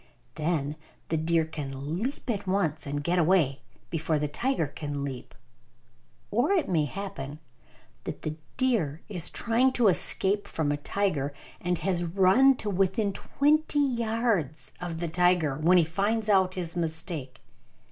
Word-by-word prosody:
Then 150 -2 -1 0.3
the 160 - +1
deer 165 +1 +2
can 145 +1 -5
leap 270 +5 -3
at 205 -5 -2
once 165 -6 0
and 145 +1 -3
get 175 +3 +1
away, 160 -6 +3 0.3
before 160 -1 0
the 150 0 -1
tiger 205 - 0
can 145 0 -5
leap. 135 -3 -6 1.0
Or 240 - +2
it 375 -5 +2
may 160 -5 +2
happen 150 -5 -6 0.7
that - - -6
the 155 0 -3 0.2
deer 190 - +1
is 180 -5 0
trying 245 +3 +2
to 235 -5 +4
escape 195 +2 +2
from 150 -3 -1
a 145 - 0
tiger 145 -4 -1 0.3
and 180 0 -1
has 180 -1 0
run 195 +10 +5
to 215 - -4
within 195 +2 +1
twenty 300 +7 +1
yards 230 - 0
of 170 -2 -4
the 170 - -1
tiger, 170 -4 +2
when 175 +4 +5
he 175 - +6
finds 205 +7 0
out 190 -2 +3
his 175 -2 -4
mistake. 160 -5 -3
175 Hz, 150 wpm, -28 LUFS, 155-205 Hz, 1.0 s, he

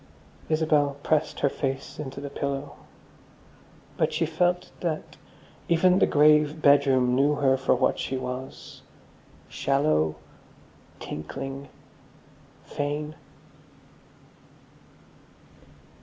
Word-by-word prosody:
Isabel 150 -3 +2
pressed 155 -1 0
her - - +4
face 135 +1 -4
into 135 -2 -6
the 140 0 -7
pillow. 140 0 -4 1.2
But - - +1
she - - 0
felt 175 +3 0
that 165 -3 -4 0.5
even 180 +2 +4
the - - +4
grave 150 +1 +4
bedroom 140 -4 +4
knew 140 +3 +3
her 135 -2 +3
for 135 0 +1
what - - +1
she 130 - -2
was, 130 +1 -7 0.7
shallow, 135 - +1 0.8
tinkling, 135 - -6 1.0
vain.... 150 +1 -3
145 Hz, 90 wpm, -26 LUFS, 135-155 Hz, 1.2 s, her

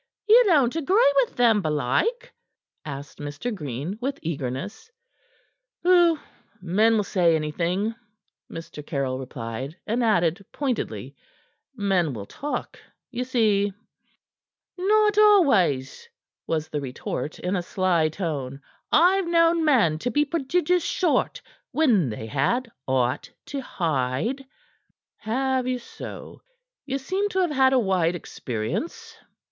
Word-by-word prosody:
"Ye 455 +3 +8
don't 285 -7 +3
agree 325 - +3
with 265 -3 +2
them, 230 -4 +4
belike?" 155 - -1 0.5
asked 140 -1 -8
Mr. 145 +11 -4
Green, 150 - -5
with 275 +2 -2
eagerness. 155 - -4 0.9
"Pooh! 345 -2 +5 0.4
Men 210 +6 +3
will 210 - +1
say 175 -5 +2
anything," 170 +7 -1 0.6
Mr. 165 -2 -8
Caryll 135 -4 -2
replied, 130 +3 -6
and 235 +3 0
added 180 -4 +2
pointedly: 270 -4 -3 0.6
"Men 190 - +1
will 105 -4 -6
talk, 290 - -5 0.3
ye 250 0 -2
see." 215 -6 +1 1.0
"Not 420 +2 +3
always," 310 - +3 0.4
was 160 -1 -1
the 150 - -3
retort 130 +2 -5
in 180 +2 -2
a 180 - 0
sly 175 -3 +1
tone. 145 -6 -4 0.3
"I've 365 +3 +4
known 335 -1 +3
men 225 - +3
to 245 - -2
be 295 +5 +2
prodigious 335 +3 0
short 350 -5 0 0.3
when 230 - +2
they 110 0 -6
had 225 - 0 0.2
aught 130 -1 0 0.2
to 280 -1 -4
hide." 165 - -2 0.7
"Have 260 +3 -1
ye 255 0 0
so? 240 - -10 0.5
Ye 270 0 -1
seem 380 +9 -1
to 380 -1 0
have 350 -4 +1
had 265 -2 +4
a - - +5
wide 185 -5 +1
experience." 150 - -5
210 Hz, 120 wpm, -24 LUFS, -, 1.0 s, Ye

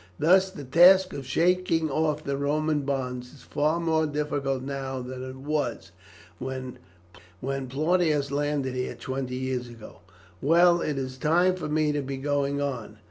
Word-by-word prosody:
Thus 185 +4 +4
the 165 -6 -9
task 180 +7 +6
of 135 -3 -6
shaking 165 0 +1
off 155 +1 0
the 140 -2 -2
Roman 150 +2 0
bonds 125 -3 -3
is 140 - -16
far 155 +3 0
more 160 -2 +1
difficult 145 -3 -2
now 135 -1 -4
than 125 +1 -6
it 130 0 -7
was 135 -8 -3 0.5
when 130 -1 -5 0.6
Plautius 140 +3 0
landed 145 -2 -1
here 125 0 -3
twenty 130 -1 -4
years 130 -1 -2
ago. 115 -2 -12 0.4
Well, 170 +3 +5
it 150 -2 -2
is 130 -1 -4
time 175 +5 +3
for 155 -4 -5
me 155 0 +2
to 145 0 -1
be 135 0 -5
going 140 0 0
on. 125 -7 -4
140 Hz, 155 wpm, -26 LUFS, 130-155 Hz, 0.6 s, task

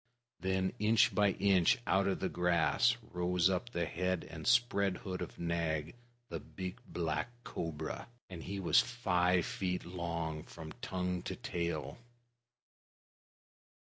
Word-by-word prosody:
Then 95 +1 0
inch 110 0 +4
by 100 -2 +4
inch 95 -3 +4
out 95 -1 +3
of 95 - 0
the 95 - +1
grass 90 +8 +3
rose 90 0 +2
up 95 +6 -1
the 85 -7 -1
head 90 +2 -1
and 80 -1 -7
spread 120 -6 +3
hood 95 -1 -5
of - - -6
Nag, 85 -2 -1 0.3
the - - -4
big 95 -1 -7
black 80 +2 -1
cobra, 80 -3 -4 0.2
and 90 -3 -8
he 100 +3 -4
was 90 - +5
five 90 -7 +2
feet 90 -1 -2
long 85 -3 -3
from 80 0 -9
tongue 90 -1 -2
to - - -4
tail. 85 +2 -3
90 Hz, 135 wpm, -34 LUFS, 85-95 Hz, 0.3 s, was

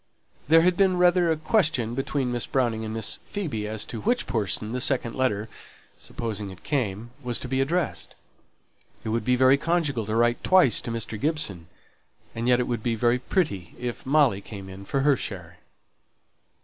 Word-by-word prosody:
There 165 +2 +6
had 180 0 +3
been 190 -2 +3
rather 180 -1 +4
a 160 - +2
question 155 - +1
between 135 0 -1
Miss 120 -1 -2
Browning 120 -4 0
and 110 - -4
Miss 110 -1 -3
Phoebe 135 - -3
as 110 0 -3
to 115 - -6
which 245 - +1
person 105 -1 -1
the 125 +1 -2
second 125 -4 +1
letter 110 -5 0 0.5
(supposing 110 -3 -5
it 95 -1 -12
came) 120 -5 -2
was 125 -3 -1
to - - -6
be 130 +1 0
addressed 165 +4 -1
to. - - -21 0.9
It - - -4
would 115 +1 0
be 125 0 +2
very 130 +2 +5
conjugal 145 -8 0
to 110 - -1
write 120 +1 +2
twice 180 - +4
to 115 - -5
Mr. 115 -2 -4
Gibson; 105 - -1 0.7
and 115 +1 -3
yet 125 0 +4
it 125 - 0
would 120 -3 -2
be 115 +1 0
very 120 +2 +2
pretty 125 - -2
if 120 -1 -5
Molly 135 -7 +3
came 100 -2 -9
in 95 +1 -10
for 135 +6 -1
her 145 0 +4
share. 90 -7 -7
120 Hz, 190 wpm, -25 LUFS, 110-145 Hz, 0.9 s, There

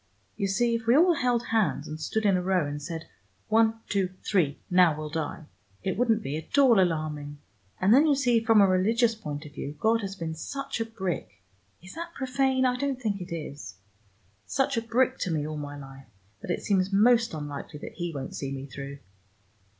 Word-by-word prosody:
You 200 - -1
see 235 +5 +1
if 230 -1 -3
we 240 +4 +6
all 345 +2 +6
held 245 -5 0
hands 215 -11 +1
and 155 +1 -7
stood 220 +6 -1
in 195 -2 +4
a 180 - +1
row 185 -3 +1
and 145 0 -5
said, 165 +1 -6 0.4
'One, 225 0 +3
two, 190 -2 -1
three, 165 -9 +2
now 180 -4 +4
we'll 155 -1 -5
die,' 160 0 -3 0.4
it 190 - -1
wouldn't 225 -1 +2
be 140 - -3
at 160 - -5
all 255 -7 +6
alarming. 155 -4 -1 0.4
And 195 +4 +4
then 290 +5 +6
you 290 - +4
see 245 -4 +3
from 225 -3 +5
a 200 - +6
religious 225 +6 +3
point 155 -9 -6
of 145 - -11
view, 145 +1 -6
God 225 +1 +2
has 195 -1 -5
been 165 -3 -4
such 275 - -5
a - - 0
brick 190 - -5 0.4
is 185 - -11
that 335 +1 -7
profane? 260 0 +1
I 250 -1 +2
don't 275 -1 -2
think 205 -5 -2
it 175 - -8
is 150 - -6 0.7
such 275 0 0
a 230 - +1
brick 250 +3 +1
to - - -1
me 150 -2 -1
all 155 0 -4
my 145 0 -6
life, 135 -2 -11 0.3
that - - -9
it 175 - -1
seems 195 -1 +1
most 225 0 +4
unlikely 145 0 -6
that - - -7
He 175 -2 -4
won't 140 -4 -6
see 135 -1 -4
me 135 0 -5
through. 140 +1 -8
190 Hz, 210 wpm, -27 LUFS, 155-235 Hz, 0.7 s, we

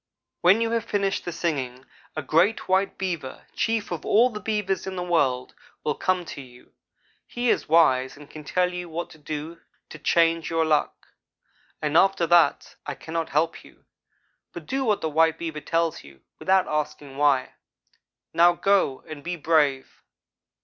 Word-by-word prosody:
When 190 +6 +5
you 230 0 0
have 230 -1 0
finished 200 -3 -1
the 175 - -3
singing, 135 -7 -3 0.3
a 155 - -3
great 170 +11 +2
white 190 +1 +1
Beaver, 170 -8 -4
chief 225 -3 -1
of 170 - -4
all 240 +4 +4
the 210 - -6
Beavers 210 -4 -2
in 190 - -4
the 180 - -3
world, 140 -8 0 0.3
will 150 - 0
come 185 +2 -1
to 140 - -8
you. 125 -2 -17 0.5
He 245 0 0
is - - -1
wise 135 -5 +3
and 145 0 -13
can 155 +1 -11
tell 180 +4 0
you 180 -1 -6
what 170 +2 -5
to 160 - -15
do 155 +2 -6 0.3
to 155 - -10
change 165 +1 +2
your 165 -1 +1
luck. 150 -2 0 0.7
After 170 +4 +3
that 170 -3 +3
I 145 - -3
cannot 165 +2 -4
help 160 +3 0
you; - - -20 0.7
but - - -8
do 270 0 -2
what 215 -5 +1
the 160 - -1
white 160 +1 +3
Beaver 160 -3 -5
tells 165 0 -1
you, 70 -1 -16 0.2
without 190 0 +2
asking 150 -2 -4
why. 140 -3 +2 0.8
Now 170 +1 +6
go, 190 -7 +1
and 155 -2 -8
be 175 +2 -3
brave!' 145 -4 +1
165 Hz, 170 wpm, -25 LUFS, 150-185 Hz, 0.8 s, Now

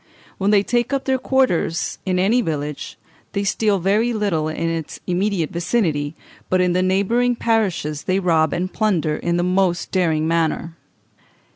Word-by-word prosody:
When 195 +1 +1
they 205 -1 +4
take 240 +4 0
up 275 - -1
their 265 -1 +1
quarters 250 -12 0
in 185 -1 +1
any 210 +7 +3
village 150 - -4 0.4
they 200 - -1
steal 205 +1 +1
very 210 +6 +1
little 195 -8 0
in 160 +1 -2
its 165 -2 -4
immediate 180 -2 0
vicinity, 165 -5 -1 0.3
but 185 - +2
in 180 -1 +2
the 180 - +2
neighbouring 200 +7 +2
parishes 195 -11 -1
they 185 +1 +1
rob 160 -5 +2
and 185 +2 -2
plunder 170 -8 +1
in 170 0 -1
the 175 - +1
most 180 -1 0
daring 160 -4 +1
manner. 165 0 -1
185 Hz, 160 wpm, -21 LUFS, 165-210 Hz, 0.4 s, they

